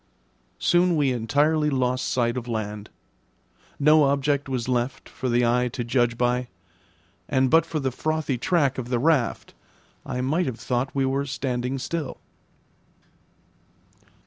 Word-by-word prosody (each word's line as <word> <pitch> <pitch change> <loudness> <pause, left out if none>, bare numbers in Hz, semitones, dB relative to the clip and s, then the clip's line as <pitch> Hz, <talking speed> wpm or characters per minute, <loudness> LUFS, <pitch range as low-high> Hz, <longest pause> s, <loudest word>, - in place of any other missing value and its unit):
Soon 175 0 +3
we 145 -4 +2
entirely 145 +6 +1
lost 130 -2 0
sight 120 -1 0
of 125 -1 -5
land; 105 -2 -4 0.9
no 150 +1 +5
object 140 0 0
was 125 -3 -2
left 125 +1 -2
for 130 - -4
the 120 0 +3
eye 125 +1 +2
to 120 0 -4
judge 120 -1 +1
by, 125 +1 0 0.8
and 130 -1 +2
but 165 0 +5
for 160 - -2
the 135 -2 -1
frothy 155 +1 -1
track 140 -6 +1
of 125 -1 -5
the 125 - +1
raft, 135 -2 +1 0.5
I 125 - -4
might 155 +7 0
have 120 -3 -4
thought 125 +2 -2
we 135 -1 +2
were 135 +1 -1
standing 130 -1 -2
still. 150 +1 -4
130 Hz, 145 wpm, -24 LUFS, 120-145 Hz, 0.9 s, no